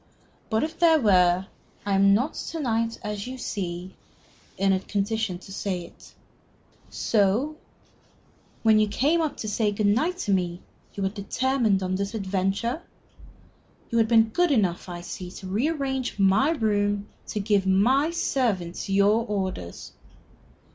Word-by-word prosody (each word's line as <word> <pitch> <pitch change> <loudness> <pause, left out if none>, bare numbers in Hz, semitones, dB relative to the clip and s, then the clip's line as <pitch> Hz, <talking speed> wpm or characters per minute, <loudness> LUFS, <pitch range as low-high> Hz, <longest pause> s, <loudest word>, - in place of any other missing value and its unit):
"But 220 +3 +1
if 320 +1 -4
there 325 -2 +5
were, 185 -5 +4 0.4
I 200 - 0
am 195 +1 +5
not 260 +9 0
to 325 - -5
night, 230 -4 -1
as 210 +1 -4
you 260 +1 -6
see, 185 -5 -5 0.6
in 195 0 +3
a 190 - +1
condition 205 -1 -2
to 195 +2 -13
say 190 -3 -2
it. 170 - -15 0.7
So 225 +8 +1 1.1
when 220 -1 +5
you 215 - +3
came 295 +11 +1
up 310 -2 -2
to 215 - -5
say 210 0 +1
good 205 +1 -1
night 305 - +2
to 200 - +2
me 175 -2 -1 0.3
you 200 - -3
had 190 +1 -1
determined 220 -1 0
on 185 0 -2
this 200 +3 -2
adventure? 200 - -1 1.1
You 230 - +2
had 225 - +3
been 225 -1 +4
good 350 +9 +2
enough, 190 - +1
I 175 -1 -6
see, 180 +1 -7
to 190 - -10
rearrange 265 +4 -1
my 195 +8 +4
room 205 -7 0 0.2
to 210 - -3
give 200 -1 +1
my 250 +11 +3
servants 235 - -1
your 200 +3 +3
orders." 190 - -4
210 Hz, 150 wpm, -25 LUFS, 195-245 Hz, 1.1 s, there